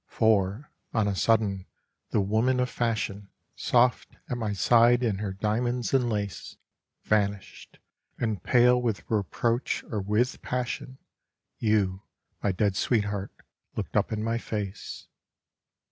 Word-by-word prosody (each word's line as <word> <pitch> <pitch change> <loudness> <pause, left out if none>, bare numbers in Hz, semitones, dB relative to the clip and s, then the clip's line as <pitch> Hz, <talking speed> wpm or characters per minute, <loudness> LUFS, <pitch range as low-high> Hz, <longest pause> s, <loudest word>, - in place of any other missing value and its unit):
For, 110 +4 +1 0.2
on 110 -2 +2
a 100 - 0
sudden, 100 -3 +1 0.4
the 105 - +2
woman 110 +6 +2
of 125 0 0
fashion, 105 -4 -2 0.3
Soft 125 0 +2 0.2
at - - 0
my 110 -3 -2
side 120 +5 +4
in 105 -5 0
her 105 -2 -2
diamonds 120 +5 -1
and 125 -3 +3
lace, 100 -7 -4 0.5
Vanished, 100 -2 -1 0.4
and 110 -6 -1
pale 125 +3 +4
with 115 -4 -2
reproach 115 +3 0
or 105 -3 -1
with 105 +6 0
passion, 125 +1 -3 0.6
You, 100 -4 +1 0.4
my 100 - +1
dead 100 +1 +1
sweetheart, 105 -2 0 0.4
looked - - -4
up - - +2
in 110 -1 -2
my 115 +1 0
face. 105 -3 -5
110 Hz, 130 wpm, -27 LUFS, 100-120 Hz, 0.6 s, side